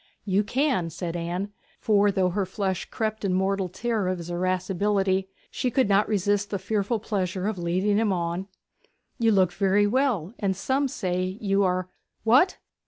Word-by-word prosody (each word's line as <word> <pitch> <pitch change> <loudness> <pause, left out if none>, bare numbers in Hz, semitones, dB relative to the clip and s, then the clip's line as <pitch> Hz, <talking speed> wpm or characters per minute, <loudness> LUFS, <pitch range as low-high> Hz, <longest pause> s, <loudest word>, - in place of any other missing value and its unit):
'You 200 0 +2
can,' 250 - 0
said 170 +1 -5
Anne; 175 +4 -3 0.3
for 205 -1 +3
though 185 -1 +2
her 195 +3 0
flesh 190 -1 -2
crept 220 -1 -3
in 190 -2 +1
mortal 190 0 0
terror 215 +1 -1
of 185 0 0
his 170 0 -7
irascibility, 190 +2 0 0.2
she 255 - -1
could 255 -1 +2
not 200 +1 +3
resist 205 0 +1
the 200 - -1
fearful 205 +3 -1
pleasure 190 -3 -2
of 215 -4 -2
leading 185 +4 +1
him 220 -2 +2
on. 175 +1 -2 0.7
'You 225 -1 +4
look 190 -4 +4
very 200 +1 +3
well; 220 - +1
and 195 -3 0
some 265 +8 0
say, 185 -4 -2
you 200 -1 +1
are 185 -1 0 0.2
' - - -50
'What? 255 +12 +4
195 Hz, 170 wpm, -26 LUFS, 185-210 Hz, 0.7 s, You